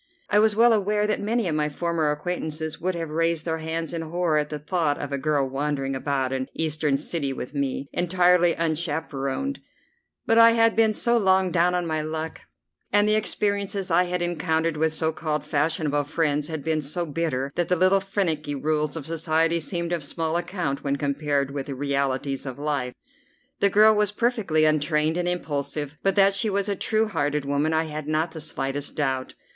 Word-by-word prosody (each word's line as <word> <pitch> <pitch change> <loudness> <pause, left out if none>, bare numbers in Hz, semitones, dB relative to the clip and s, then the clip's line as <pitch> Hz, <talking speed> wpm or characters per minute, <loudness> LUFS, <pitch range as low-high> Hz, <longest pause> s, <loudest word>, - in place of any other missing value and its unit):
I 205 - +5
was 215 -1 +3
well 235 +1 +6
aware 210 0 +1
that 210 - -1
many 220 0 0
of 165 - -1
my 150 0 0
former 165 0 -1
acquaintances 160 0 -3
would 185 +1 -1
have 165 -2 -4
raised 165 0 0
their 160 -1 -1
hands 160 +1 -3
in 165 - -2
horror 165 -1 0
at 150 0 -2
the 150 - -4
thought 150 -1 0
of 145 - -5
a 140 - -1
girl 145 -1 +1
wandering 135 0 -2
about 135 -1 -1
an 130 0 -2
Eastern 155 -3 0
city 145 -1 -2
with 130 +1 -6
me, 140 -1 -2
entirely 175 -1 +3
unchaperoned; 160 - -2 0.7
but 225 0 +4
I 230 0 +8
had 230 -1 +3
been 220 -1 +4
so 235 +2 +2
long 190 -2 +3
down 180 +1 +2
on 175 -1 -1
my 155 -1 -1
luck, 160 +1 -5 0.5
and 205 +1 +4
the 215 - +3
experiences 200 -2 -1
I 180 - +4
had 180 0 -2
encountered 165 -2 0
with 160 +1 +1
so 160 0 0
called 155 -2 -3
fashionable 150 -1 0
friends 150 -1 0
had 160 -3 -5
been 155 0 0
so 165 +5 -3
bitter, 145 -4 -2
that 175 -1 -1
the 180 - +3
little 185 +3 +4
finicky 165 -7 -2
rules 150 +1 -1
of 160 -4 -6
society 165 +1 +1
seemed 170 +1 -3
of 170 -3 -1
small 160 +3 -2
account 175 -5 -2
when 140 -1 0
compared 140 -1 -1
with 140 -1 -4
the 140 - -4
realities 140 0 -1
of 130 - -6
life. 140 -4 -2 0.6
The 200 - +4
girl 215 +2 +6
was 210 -1 +2
perfectly 210 -9 +1
untrained 155 +1 +2
and 175 0 -1
impulsive, 150 -3 -3
but 195 -1 +1
that 200 -1 +5
she 215 +3 +1
was 200 0 0
a 200 - 0
true 220 +3 +1
hearted 145 -6 -1
woman 145 +3 0
I 160 0 +2
had 155 -1 -6
not 155 +2 0
the 160 -1 -7
slightest 145 -2 -3
doubt. 130 -3 -2
160 Hz, 195 wpm, -25 LUFS, 145-180 Hz, 0.7 s, I